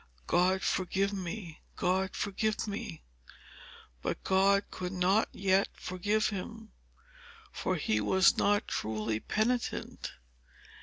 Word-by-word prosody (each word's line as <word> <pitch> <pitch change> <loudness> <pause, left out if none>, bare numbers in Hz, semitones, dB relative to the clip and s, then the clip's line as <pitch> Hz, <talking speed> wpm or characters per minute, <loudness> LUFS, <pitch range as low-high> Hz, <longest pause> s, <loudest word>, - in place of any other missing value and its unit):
"God 185 - +3
forgive 195 +2 +1
me! 185 -3 -5
God 190 +1 0
forgive 215 +2 -1
me!" 85 - -5 1.0
But - - -3
God 195 +1 +4
could 180 -1 -4
not 190 +4 +3
yet 195 0 +2
forgive 205 +4 0
him; 220 +2 -6 0.8
for 185 - -1
he 110 -10 +1
was 190 - +5
not 205 0 +2
truly 110 0 -2
penitent. 235 - -1
190 Hz, 105 wpm, -31 LUFS, 180-205 Hz, 1.0 s, was